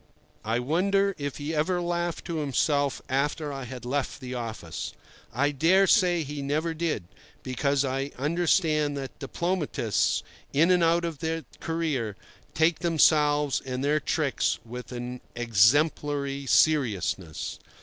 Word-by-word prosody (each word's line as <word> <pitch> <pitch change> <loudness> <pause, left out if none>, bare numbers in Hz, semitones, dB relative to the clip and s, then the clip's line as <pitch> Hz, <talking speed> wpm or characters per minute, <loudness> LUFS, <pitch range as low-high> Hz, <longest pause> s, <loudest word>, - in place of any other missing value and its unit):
I 115 +2 0
wonder 190 +10 +2
whether 145 -1 -4
he 150 +2 -4
ever 160 +4 +1
laughed 175 -1 -2
to 170 - -3
himself 145 -1 0
after 145 +2 -1
I 135 -1 -5
had 125 0 -8
left 135 +2 -2
the 130 -2 -6
office. 110 -9 -5 0.4
I 145 +5 +1
dare 170 +7 +4
say 180 -4 +3
he 145 0 -5
never 155 +4 -1
did, 160 - -2 0.4
because 140 +2 0
I 135 +1 -2
understand 155 0 +1
that 135 -1 -7
diplomatists, 150 - 0 0.3
in 165 +6 +4
and 180 -2 +4
out 170 +1 +3
of 165 -4 -4
the 160 0 -2
career, 155 -10 -2 0.4
take 160 0 +3
themselves 150 -3 +3
and 130 0 -4
their 150 +2 +2
tricks 150 -3 0
with 125 +2 -8
an 125 0 -5
exemplary 140 +5 +2
seriousness. 105 - +1
145 Hz, 135 wpm, -27 LUFS, 130-165 Hz, 0.4 s, dare